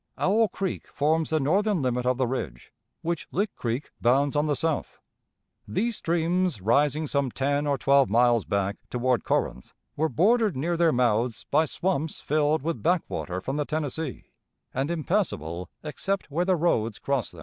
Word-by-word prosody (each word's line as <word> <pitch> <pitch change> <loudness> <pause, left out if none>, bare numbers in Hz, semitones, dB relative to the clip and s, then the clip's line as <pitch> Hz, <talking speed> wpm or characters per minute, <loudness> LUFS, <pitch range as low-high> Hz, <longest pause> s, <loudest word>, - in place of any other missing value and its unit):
Owl 220 +4 +3
Creek 190 -1 -4
forms 155 +2 +1
the 160 - +2
northern 190 +4 +1
limit 125 -1 0
of 125 -1 +2
the 130 - +2
ridge, 90 - -5 0.3
which 170 -1 -2
Lick 200 +2 -1
Creek 120 +4 -3
bounds 135 +4 +3
on 145 +1 +2
the 145 - +1
south. 160 0 -2 0.7
These 220 - -1
streams, 170 - 0
rising 145 +9 +2
some 140 -2 0
ten 140 +3 0
or 140 -1 +1
twelve 140 +2 +4
miles 120 0 +4
back, 100 0 -1
toward 125 -2 +1
Corinth, 65 - -1 0.2
were 160 +2 +1
bordered 205 - +3
near 170 +6 0
their 170 -1 +3
mouths 120 -2 +1
by 160 - +4
swamps 160 -1 -2
filled 150 0 +1
with 165 +1 -2
backwater 160 - -1
from 135 +9 -3
the 150 - 0
Tennessee, 155 -1 -4 0.4
and 135 +3 -1
impassable 150 - -1
except 190 +3 -3
where 170 +5 0
the 185 0 +3
roads 115 -10 +1
crossed 135 -8 -2
them. 85 - -12
145 Hz, 165 wpm, -26 LUFS, 125-170 Hz, 0.7 s, twelve